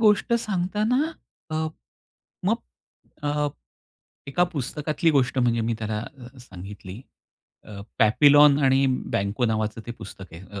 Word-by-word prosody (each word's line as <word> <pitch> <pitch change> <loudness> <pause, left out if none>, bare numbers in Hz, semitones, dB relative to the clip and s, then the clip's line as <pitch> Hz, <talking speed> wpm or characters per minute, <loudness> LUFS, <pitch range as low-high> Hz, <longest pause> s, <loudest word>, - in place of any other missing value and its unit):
गोष्ट 215 +1 +3
सांगताना 215 - 0 0.4
अ, 155 0 -1 0.8
मग - - +3 0.7
अ, 145 0 0 0.8
एका 175 +6 +2
पुस्तकातली 150 +3 -1
गोष्ट 135 -2 +1
म्हणजे 120 -2 +2
मी, 115 +1 0
त्याला 110 -1 -3
अ, 125 +1 -11
सांगितली 95 -2 -10 0.6
अ, 100 -2 -9 0.2
"पॅपीलॉन 145 +5 +6
आणि 135 +1 +4 0.3
बँको" 100 +5 0
नावाचं 110 0 -1
ते 120 - -4
पुस्तक 95 -2 -10
आहे, 85 +3 -10
अ, 100 +1 -8
130 Hz, 125 wpm, -25 LUFS, 110-155 Hz, 0.8 s, पॅपीलॉन